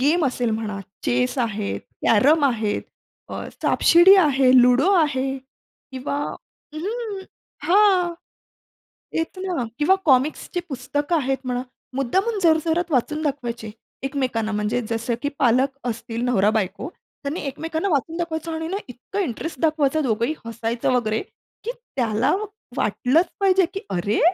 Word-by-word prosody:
Game 305 +5 +3
असेल 245 -2 -1
म्हणा, 215 -2 -3 0.3
chess 125 +1 +1
आहेत, 215 -4 -2 0.3
कॅरम 285 +8 +5
आहेत, 220 -5 0 0.5
अ, - - -5 0.2
सापशिडी 350 +4 +6
आहे, 275 -7 +4
लुडो 250 +9 +4
आहे 275 -6 +1
किंवा 265 +1 -8 0.6
अं, 310 - -6
हं, 420 0 -4 0.5
हां. 370 -2 +4 1.0
तेच 325 +3 -3
ना. 365 -9 -2
किंवा 310 +6 +4
कॉमिक्सची 295 +5 +2
पुस्तकं 290 +4 -1
आहेत 270 -2 0
म्हणा, 250 0 -2 0.3
मुद्दामून 380 - 0
जोरजोरात 330 +1 +2
वाचून 300 +5 0
दाखवायचे 240 -7 -3 0.3
एकमेकांना. 255 -6 -1
म्हणजे 210 +4 0
जसं 230 +2 -1
की 285 - 0
पालक 260 +3 +3
असतील, 230 +1 -4
नवरा-बायको 220 - +1 0.3
त्यांनी 285 +5 -3
एकमेकांना 320 +6 -3
वाचून 320 +1 0
दाखवायचं 330 -1 -3
आणि 320 0 -3
ना 385 - -2
इतकं 250 - -6
इंटरेस्ट 290 - -4
दाखवायचं. 310 -1 +2
दोघंही 235 +4 0
हसायचं 230 +2 -2
वगैरे, 225 -3 +1 0.4
की 470 - -2 0.3
त्याला 230 +2 +2 0.4
वाटलंच 310 +8 +2
पाहिजे, 380 -1 +4
की 390 - -3
"अरे! 190 +3 0
275 Hz, 130 wpm, -23 LUFS, 235-325 Hz, 1.0 s, सापशिडी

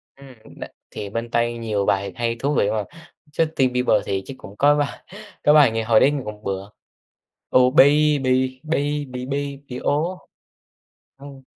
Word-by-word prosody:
Ừm, 135 -1 -14 0.3
đ - - -5 0.3
thì 100 - -6
bên 115 +2 -4
Tây, 120 0 +1
nhiều 105 -3 -2
bài 100 +1 0
hay, 115 -1 -1
thú 145 +2 -1
vị 100 - +2
mà, 110 -1 -1 0.5
Justin 155 -5 0
Bieber 125 -4 +2
thì 95 -1 -2
chứ 135 - -8
cũng 100 - -12
có 145 +1 +4
bài 145 -1 -3 0.4
có 150 - +5
bài 145 -6 +6
nghe 115 0 -2
hồi 110 -1 +4
đấy 140 - +4
nghe 145 -2 -3
cũng 105 0 -8
bựa 100 +1 -4 0.9
"Oh 130 +1 +5
baby, 150 -1 +5 0.5
baby 145 -2 -1
baby, 135 +1 -5
oh," 165 +6 0 1.0
ừm. 140 -1 -12
130 Hz, 165 wpm, -22 LUFS, 110-145 Hz, 1.0 s, bài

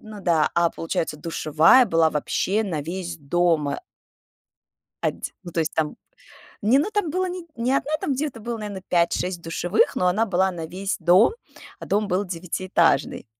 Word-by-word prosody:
ну 215 -2 -10
да, 165 -4 +2
а, 170 -1 +3
получается, 160 -1 -3
душевая 165 - +4
была 165 -4 +3
вообще 195 +7 0
на 160 -7 -3
весь 175 +1 -5
дома. 155 0 +1 1.2
Адь - - -2
ну, 175 - -8
то 165 - -1
есть, 160 0 -1
там 155 -2 -1 0.7
не 240 +6 +4
ну, 340 +9 0
там 410 -7 -1
было 370 +2 -1
не 360 -1 -6
не 240 +2 -1
1, 280 +2 0
там 280 - -1
где-то 265 -4 -3
было, 235 +1 -4
наверно, 205 -3 -6
5-6 175 0 0
душевых, 175 +4 +1
но 180 - +2
она 210 +6 +2
была 190 -2 +1
на 165 -3 -6
весь 195 +4 -3
дом, 180 - +5 0.4
а - - -8
дом 205 +1 0
был 190 +2 0
девятиэтажный. 175 -3 0
180 Hz, 170 wpm, -23 LUFS, 165-220 Hz, 1.2 s, дом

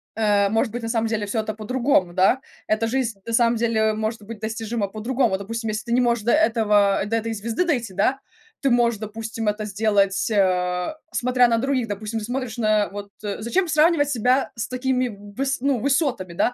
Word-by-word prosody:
э, 205 -2 +2
может 225 +2 +1
быть 240 - -4
на 225 - -4
самом 225 -1 0
деле 215 -2 -2
всё 220 +2 0
это 215 0 -4
по-другому, 220 -4 0
да? 195 +8 +3 0.3
Эта 215 +1 +1
жизнь 230 -5 -1
на 230 - -4
самом 235 0 +3
деле 220 -1 +1
может 220 0 -3
быть 215 0 -9
достижима 220 -1 -3
по-другому. 225 0 0
Допустим, 225 +3 -4
если 215 +2 -3
ты 235 - -5
не 250 - +4
можешь 235 -3 +1
до 235 - +2
этого 210 -9 +3
до 225 +2 0
этой 225 0 -3
звезды 225 - -2
дойти, 240 - -1
да, 230 +8 +1 0.4
ты 275 - +2
можешь, 235 -3 +2
допустим, 220 +1 -5
это 210 +1 -1
сделать, 200 -1 +1
э, 180 0 +1 0.2
смотря 250 0 +3
на 230 -1 +2
других. 260 -1 0
Допустим, 210 +2 -4
ты 215 - -5
смотришь 245 -1 -4
на 215 -2 +2
вот, 200 0 -8
э 205 -1 -3
зачем 350 - 0
сравнивать 310 -2 +3
себя 255 +1 +1
с 225 - -3
такими 255 0 0
выс 210 +7 -4
ну, 275 -2 +1
высотами, 260 - 0
да. 245 - +1
225 Hz, 200 wpm, -23 LUFS, 210-245 Hz, 0.4 s, не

